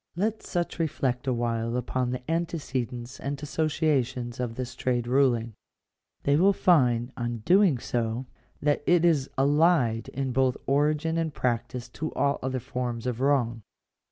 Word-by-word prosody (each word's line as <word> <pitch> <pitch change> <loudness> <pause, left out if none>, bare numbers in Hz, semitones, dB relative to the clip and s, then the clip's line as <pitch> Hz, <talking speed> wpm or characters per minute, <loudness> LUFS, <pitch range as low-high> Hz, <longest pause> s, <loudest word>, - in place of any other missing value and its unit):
Let 215 +5 -1
such 175 -1 -3
reflect 135 -5 -1
awhile 115 -1 0
upon 125 0 -1
the 125 0 -4
antecedents 135 -7 -3
and 140 +1 -4
associations 140 -6 0
of 120 -2 -3
this 125 0 -5
trade 125 -1 -1
ruling. 120 -3 +2 0.7
They 140 +1 +3
will 195 +5 +5
find, 125 -10 +3
on 120 -2 -4
doing 185 -6 +5
so, 120 +1 -2 0.4
that 145 0 +2
it 175 -1 +4
is 150 -6 +2
allied 140 -4 +3
in 135 -1 -3
both 130 0 +2
origin 150 +3 +1
and 160 -1 -1
practice 120 -1 -2
to 155 +5 -5
all 140 0 +1
other 130 0 -2
forms 125 -2 -4
of 125 -1 -2
wrong. 125 -5 +1
130 Hz, 145 wpm, -27 LUFS, 120-155 Hz, 0.7 s, will